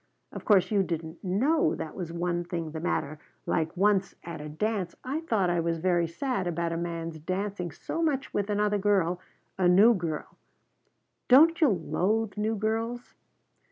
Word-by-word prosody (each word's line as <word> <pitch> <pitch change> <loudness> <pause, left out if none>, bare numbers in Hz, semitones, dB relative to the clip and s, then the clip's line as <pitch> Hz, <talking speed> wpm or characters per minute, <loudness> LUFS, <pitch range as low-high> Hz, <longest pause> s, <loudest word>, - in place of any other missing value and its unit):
Of - - -8
course, 200 -3 +4
you 205 -2 +3
didn't 165 -1 -4
know 250 - +2
that 155 - -6
was 175 -3 -5
one 175 0 -1
thing 170 -2 -4
the 160 - -5
matter; 155 -2 -2 0.3
like 160 +3 -1
once 195 0 +2
at 165 -3 -7
a 150 - -7
dance 190 +3 -2
I 270 +5 -2
thought 215 - 0
I 175 - +1
was 165 0 0
very 175 0 +1
sad 245 - -2
about 170 0 -1
a - - -2
man's 165 -1 -4
dancing 185 +2 -3
so 245 - -5
much 290 -4 -1
with 205 0 -1
another 210 0 +1
girl, 190 -3 +1 0.4
a 180 - +4
new 200 +7 +7
girl 165 -6 -4 0.9
don't 325 +6 +6
you 310 - +7
loathe 200 +3 0
'new 215 +1 -1
girls'? 225 +3 -2
185 Hz, 170 wpm, -28 LUFS, 170-215 Hz, 0.9 s, new